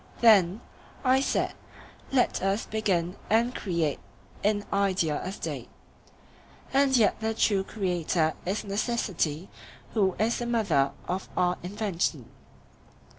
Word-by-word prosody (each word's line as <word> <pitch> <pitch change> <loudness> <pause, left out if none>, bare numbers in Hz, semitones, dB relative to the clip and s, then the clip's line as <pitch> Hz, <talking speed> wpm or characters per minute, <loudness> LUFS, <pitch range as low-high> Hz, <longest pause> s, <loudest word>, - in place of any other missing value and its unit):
Then, 205 -4 +5 0.4
I 260 0 +4
said, - - 0 0.6
let 260 -2 +2
us 195 +3 0
begin 190 -5 -1
and 235 +3 +3
create 170 - -1 0.4
in 205 0 +1
idea 190 -6 +1
a 185 - -3
State; 200 - -5 1.0
and 270 -1 +4
yet 220 -3 +3
the 220 0 -1
true 200 -3 +2
creator 175 -5 0
is 195 +4 -2
necessity, 195 -6 -1 0.5
who 195 -5 +2
is 225 +2 +1
the 240 - -3
mother 195 -13 +2
of 185 +2 -3
our 180 0 +2
invention. 180 - -2
200 Hz, 120 wpm, -27 LUFS, 175-220 Hz, 1.0 s, Then